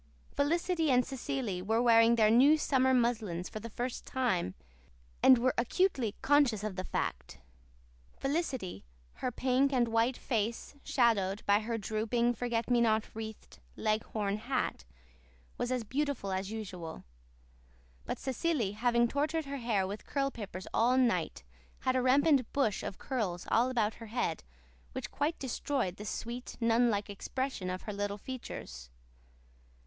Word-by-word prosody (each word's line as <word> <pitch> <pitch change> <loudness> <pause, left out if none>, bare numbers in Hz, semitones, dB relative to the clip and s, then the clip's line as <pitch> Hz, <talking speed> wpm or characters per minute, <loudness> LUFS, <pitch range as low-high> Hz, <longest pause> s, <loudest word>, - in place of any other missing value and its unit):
Felicity 330 +2 +1
and 250 -2 +4
Cecily 260 -7 -3
were 220 +5 +1
wearing 230 -1 +6
their 215 -2 +4
new 275 +7 +6
summer 260 -3 +2
muslins 220 -8 +1
for 215 - -6
the 230 - -7
first 245 +3 -4
time 210 - -1 0.7
and 260 - +8
were 255 +2 +2
acutely 250 - +1
conscious 275 -8 +3
of 215 -3 -3
the 185 - -3
fact. - - -3 0.8
Felicity, 270 - -2 0.4
her 250 - 0
pink 260 +3 +2
and 245 -3 +2
white 230 +3 +2
face 230 0 -2
shadowed 210 -5 +1
by 205 0 +4
her 225 +1 -3
drooping, 225 +3 0
forget 235 -1 -2
me 245 -1 +3
not 220 -1 +1
wreathed, 220 - -8 0.2
leghorn 215 -1 -1
hat, 245 - -2 0.7
was 245 - -1
as 250 -2 0
beautiful 270 -3 -2
as 190 +1 -2
usual; 185 -7 -6 1.0
but - - -4
Cecily, 265 -5 -1
having 235 +2 +2
tortured 305 +5 -1
her 280 0 -4
hair 225 -6 0
with 200 +3 -6
curl 275 -1 0
papers 195 -6 -7
all 245 +3 +3
night, 210 - +1 0.4
had 255 - +1
a 255 - +3
rampant 270 0 +4
bush 245 -8 +1
of 190 - -5
curls 205 -10 -3
all 240 +3 +4
about 225 -4 +1
her 230 - -10
head 220 -7 -2 0.5
which - - -5
quite 295 +3 -1
destroyed 255 -6 -2
the 210 - -7
sweet, 240 +4 -5
nun 230 +1 +3
like 205 -2 -1
expression 205 0 -3
of 185 0 -4
her 210 - -5
little 205 0 -2
features. 65 - -8
235 Hz, 150 wpm, -32 LUFS, 210-260 Hz, 1.0 s, and